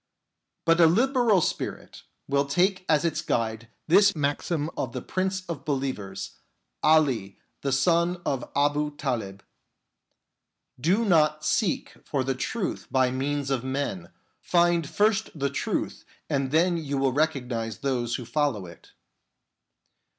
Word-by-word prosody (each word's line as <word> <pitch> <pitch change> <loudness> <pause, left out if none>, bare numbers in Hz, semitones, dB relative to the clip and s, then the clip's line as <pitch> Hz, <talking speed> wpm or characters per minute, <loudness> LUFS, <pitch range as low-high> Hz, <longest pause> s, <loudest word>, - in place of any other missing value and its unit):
But 165 +1 +4
a 165 - +8
liberal 235 +1 +3
spirit - - -4 0.3
will 140 0 +2
take 185 +6 +1
as 155 +1 +3
its 155 -1 0
guide 115 0 -2 0.2
this 200 +4 +5
maxim 150 +2 -1
of 125 - -3
the 125 - -4
Prince 190 0 -2
of 170 -6 -6
believers, 130 -8 -4 0.4
Ali 135 -11 +3 0.2
the 140 - -1
son 170 +6 +2
of 135 -3 -2
Abu 145 +1 +1
Talib: 115 -9 -3 0.7
" - - -32
Do 215 +5 +3
not 155 -5 +3
seek 205 -8 0
for 140 -3 -1
the 135 +1 0
truth 185 - -3
by 130 -1 +2
means 140 +1 -2
of 130 -3 0
men; 130 -10 -3 0.3
find 170 -3 +2
first 215 +1 +2
the 140 -1 -1
truth 140 - -2 0.2
and 135 -1 0
then 170 +4 +3
you 145 -4 -3
will 135 -1 +1
recognise 125 -7 -1
those 120 -4 -1
who 125 - -5
follow 125 -6 0
it." 85 -1 -14
145 Hz, 135 wpm, -26 LUFS, 130-170 Hz, 0.7 s, a